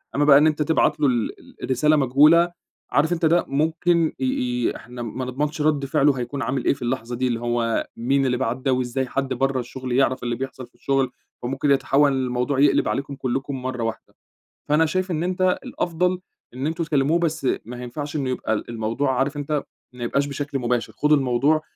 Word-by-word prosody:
أمّا 145 - +3
بقى 140 -2 +8
إن 155 +2 +5
أنت 150 0 0
تبعت 160 +2 +2
له 145 - +3
ال 120 -4 -1
ال - - -18
الرسالة 150 +4 +3
مجهولة، 150 +6 +5 0.4
عارف 155 +4 +2
أنت 170 -1 0
ده 170 +2 +3
ممكن 160 +3 +1
ي 130 - -1
ي 125 -1 0
إحنا 125 +2 -9
ما 120 +2 -4
نضمنش 150 +5 -2
رد 150 -2 +1
فعلُه 140 +1 +3
هيكون 125 +3 -4
عامل 130 +2 -2
إيه - - +4
في 140 - -14
اللحظة 120 -1 -2
دي، 130 +1 0
اللي 120 -2 -1
هو 120 -1 -1
مين 135 +4 +1
اللي 125 -1 +1
بعَت 125 -1 -1
ده 130 0 0
وإزاي 130 +1 -1
حد 135 +1 -2
برّه 135 +1 0
الشغل 130 +1 -6
يعرف 130 0 +2
اللي 120 -1 -1
بيحصل 130 0 -6
في - - -35
الشغل؟ 135 -2 0 0.3
فممكن 135 +3 0
يتحوّل 140 +1 +3
الموضوع 130 +1 -1
يقلِب 145 0 +4
عليكم 140 +1 -2
كلّكم 135 0 -3
مرّه 125 -2 -3
واحدة. 115 0 -5 0.5
فأنا 155 +2 +4
شايف 185 +3 -1
إن 160 +1 -1
أنت 185 0 +1
الأفضل 180 +1 -1 0.3
إن 130 +3 -3
أنتم 165 +1 -2
تكلّموه 155 +1 +2
بس 160 -5 -1 0.2
ما 125 +2 -7
ينفعش 145 +5 -6
إنّه 135 -4 -1
يبقى 125 -3 -1
ال 110 - -3
الموضوع 120 +4 -1
عارف 140 +2 0
أنت 145 0 -2 0.3
ما 125 -1 -7
يبقاش 140 +4 +1
بشكل 140 -1 -3
مباشر، 120 -2 -1
خدوا 150 0 +3
الموضوع 140 +4 +2
135 Hz, 200 wpm, -23 LUFS, 125-150 Hz, 0.5 s, بقى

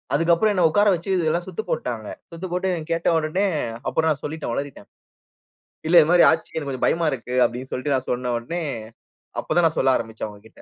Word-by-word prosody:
அதுக்கு 165 +3 +3
அப்புறம் 215 +4 +2
என்னை 180 -4 +4
உட்கார 205 +5 +3
வச்சு 175 +3 -5
இதெல்லாம் 170 +1 0
சுத்து 190 +4 -4
போட்டுட்டாங்க. 115 -4 -3 0.2
சுத்து 170 +3 -6
போட்டு 185 +1 0
என்னை 170 -3 -3
கேட்ட 165 +1 +1
உடனே, 160 +6 0 0.4
அப்புறம் 160 0 +1
நான் 140 - -4
சொல்லிட்டேன், 150 -4 -4
ஒளறிட்டேன். 140 -7 -6 1.0
இல்ல 175 - +5
இது 150 - +1
மாதிரி 175 -1 +7
ஆச்சு 160 0 -3
எனக்கு 145 -3 -3
கொஞ்சம் 130 - -1
பயமா 165 -1 +1
இருக்கு. 125 0 -5
அப்படின்னு 125 +2 -5
சொல்லிட்டு 135 +2 0
நான் 130 0 -3
சொன்ன 125 0 -2
ஒடனே, 165 +9 -4 0.8
அப்போதான் 165 +1 +2
நான் 160 - -5
சொல்ல 130 -1 +4
ஆரம்பிச்சேன் 110 -1 -6
அவங்ககிட்ட. 105 +2 -16
160 Hz, 200 wpm, -23 LUFS, 130-175 Hz, 1.0 s, மாதிரி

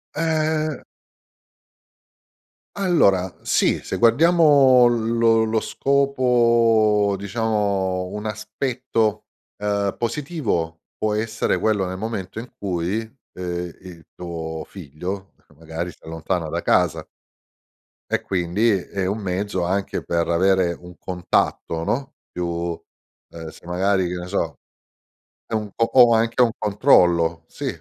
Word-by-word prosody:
Ehm 155 -2 0 1.9
Allora, 100 - +2
sì, - - +1
se - - -4
guardiamo 140 -1 +5
lo 115 -1 +2
lo 110 0 +1
scopo, 115 -7 +2
diciamo, 100 -3 -1
un 105 +1 -5
aspetto, 110 0 -2 0.3
ehm, 100 -1 -1
positivo, 120 - -2 0.2
può 110 -1 0
essere 110 +1 -1
quello 105 -3 +1
nel 95 +1 -5
momento 110 -2 -4
in 120 +2 -8
cui, 90 +1 -2 0.4
ehm, 90 -1 -5
i 90 -3 -12
tuo 80 -2 -5
figlio 95 +3 -7
che - - -24
magari 80 +3 -6
si - - -21
allontana 80 +1 -3
da - - -3
casa. - - +2 1.0
E - - +1
quindi 95 +5 0
è 95 +1 -4
un 100 +3 -2
mezzo 95 -1 -2
anche 95 +3 -2
per 85 -1 -1
avere 90 0 +2
un 90 0 -13
contatto 85 -2 -1
no, 135 - -2
più 90 - -4
uhm, 85 -1 -7
se - - -16
magari, 95 +1 +1
che 90 - -4
ne 90 0 -6
so, - - -2 0.9
è - - -9
un 105 -1 -1
o - - +2
o 120 -2 +7
anche 115 +2 +2
"un 115 - +2
controllo", 85 - +3
sì, - - -6
100 Hz, 120 wpm, -22 LUFS, 90-115 Hz, 1.9 s, o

